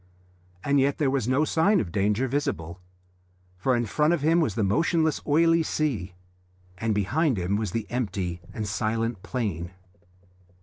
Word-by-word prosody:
And 140 0 +2
yet 140 +1 +2
there 140 -4 +1
was 135 -5 0
no 135 +4 +2
sign 190 +7 +3
of 85 - -3
danger 105 +7 +1
visible, 120 - -3 0.8
for 125 +8 +1
in 120 0 0
front 150 +9 +2
of 150 - -6
him 165 +3 +3
was 115 -11 0
the 110 - +1
motionless 160 - +1
oily 165 +2 +4
sea, 120 - -2 0.6
and 115 -1 0
behind 130 - +1
him 90 +2 0
was 105 -1 -1
the 115 +2 -3
empty 95 -8 -2
and 105 -1 -4
silent 110 +1 -1
plain. 100 -10 -3
120 Hz, 160 wpm, -26 LUFS, 100-150 Hz, 0.8 s, oily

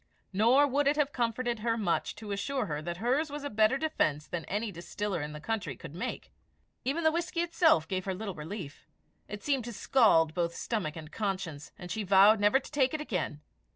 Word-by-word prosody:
Nor 235 +8 +5
would 285 +1 +1
it 290 - +4
have 290 -1 +1
comforted 240 -1 -1
her 230 +1 0
much 195 -7 0
to 210 -2 -8
assure 245 +5 -1
her 150 -4 -3
that 170 +2 -4
hers 260 - +1
was 290 0 -6
a 285 - -4
better 215 +4 +3
defence 155 - 0
than 175 -3 -5
any 210 +2 -2
distiller 185 +1 -4
in 150 +1 -4
the 150 - -7
country 190 - -3
could 140 - -10
make. 175 - -5 0.5
Even 295 +6 -1
the 315 - +5
whisky 335 +1 -1
itself 330 - +3
gave 185 -1 -2
her 190 -1 -2
little 200 0 -5
relief; 155 -4 -8 0.4
it 210 0 -7
seemed 275 -4 +1
to 240 - -5
scald 195 -9 +4
both 170 -1 -1
stomach 195 -10 -2
and 155 -1 -9
conscience, 185 -8 -3
and 180 -4 -8
she 220 - -2
vowed 200 +2 +6
never 205 +6 +4
to - - -13
take 280 -1 +2
it - - -3
again. 180 - -3
210 Hz, 210 wpm, -30 LUFS, 175-265 Hz, 0.5 s, vowed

